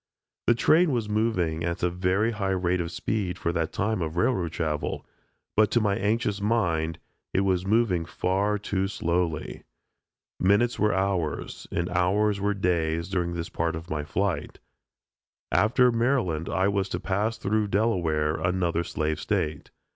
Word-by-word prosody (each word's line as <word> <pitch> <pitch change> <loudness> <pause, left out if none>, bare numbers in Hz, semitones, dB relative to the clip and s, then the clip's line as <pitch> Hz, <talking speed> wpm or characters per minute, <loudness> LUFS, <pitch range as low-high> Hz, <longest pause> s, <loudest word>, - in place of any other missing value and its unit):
The 120 - +5
train 160 +7 +4
was 115 -4 -1
moving 105 -7 0
at 85 0 -2
a 90 - +3
very 95 +5 +1
high 105 -3 -2
rate 90 0 +1
of 85 0 -4
speed 95 -1 -2
for 85 - -1
that 80 0 -1
time 100 -1 -1
of 80 +1 -3
railroad 90 -4 +1
travel, 75 -3 -2 0.5
but 105 -1 +4
to 120 - +3
my 105 -3 +1
anxious 105 0 0
mind, 85 -7 0 0.4
it 95 - +4
was 95 -1 +1
moving 100 -6 +2
far 100 +5 0
too 100 -2 -1
slowly. 85 -4 -2 0.8
Minutes 105 +6 +3
were 105 0 +3
hours, 95 -5 -2
and 85 - -1
hours 100 +3 +2
were 100 0 +1
days 85 -3 0
during 85 -3 -1
this 85 -1 -4
part 85 0 -1
of 80 +1 -8
my 75 -1 -1
flight. 95 +4 -2 0.9
After 125 +4 +4
Maryland 115 - 0
I 95 +1 +1
was 100 -1 0
to - - -2
pass 105 +4 -1
through 105 +1 0
Delaware 85 -8 +1
another 85 0 0
slave 80 -2 -2
State. 75 -1 -2
95 Hz, 155 wpm, -26 LUFS, 85-105 Hz, 0.9 s, The